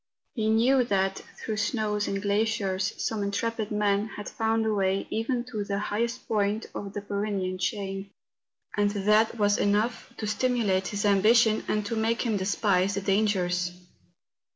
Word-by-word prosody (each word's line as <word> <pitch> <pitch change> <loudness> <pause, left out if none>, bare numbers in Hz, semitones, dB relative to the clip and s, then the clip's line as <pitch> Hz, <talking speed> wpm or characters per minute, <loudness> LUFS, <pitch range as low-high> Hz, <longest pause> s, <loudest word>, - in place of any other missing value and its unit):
He 220 -3 0
knew 250 +4 +4
that 195 -3 0 0.2
through 215 -1 -4
snows 215 -2 0
and 195 - -1
glaciers 200 -2 0
some 220 -2 -2
intrepid 215 +2 -2
men 210 0 +1
had 205 -1 -8
found 225 0 0
a 220 - +1
way 195 -1 +1
even 240 +2 -1
to 215 -3 -2
the 200 0 -2
highest 230 +4 -2
point 210 0 0
of 200 -1 -6
the 205 - -4
Py¬ 200 0 -3
renean 190 -3 -2
chain; 195 +1 -3 0.7
and 205 0 +2
that 210 +3 +2
was 205 -1 +2
enough 210 +4 0
to 220 - -4
stimulate 210 -4 +1
his 205 0 -2
ambition 215 +2 +4
and 210 -1 0
to 230 - -2
make 225 +1 0
him 230 -4 0
despise 195 -1 +1
the 200 - -1
dangers. 190 -3 +1
205 Hz, 160 wpm, -27 LUFS, 200-220 Hz, 0.7 s, knew